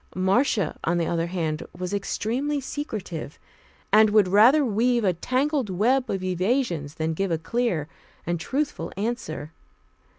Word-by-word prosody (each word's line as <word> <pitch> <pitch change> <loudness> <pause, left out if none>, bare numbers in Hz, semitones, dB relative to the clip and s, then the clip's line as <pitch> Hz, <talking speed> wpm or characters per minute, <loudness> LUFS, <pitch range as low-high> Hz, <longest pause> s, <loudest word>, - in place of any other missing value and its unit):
Marcia, 190 - +1
on 175 +2 +1
the 170 - +1
other 165 0 -1
hand, 165 -3 -2 0.2
was 180 +2 -4
extremely 245 +8 -1
secretive, 215 - -5 0.6
and 215 0 +7
would 205 -2 +4
rather 235 +10 +6
weave 235 +2 +2
a 185 -3 +3
tangled 260 - 0
web 240 +7 +1
of 190 -1 -2
evasions 185 - -1
than 160 0 -1
give 195 +4 -1
a 165 - +1
clear 185 -3 -1 0.4
and 175 0 -1
truthful 280 - -2
answer. 195 -9 -3
200 Hz, 140 wpm, -25 LUFS, 170-245 Hz, 0.6 s, and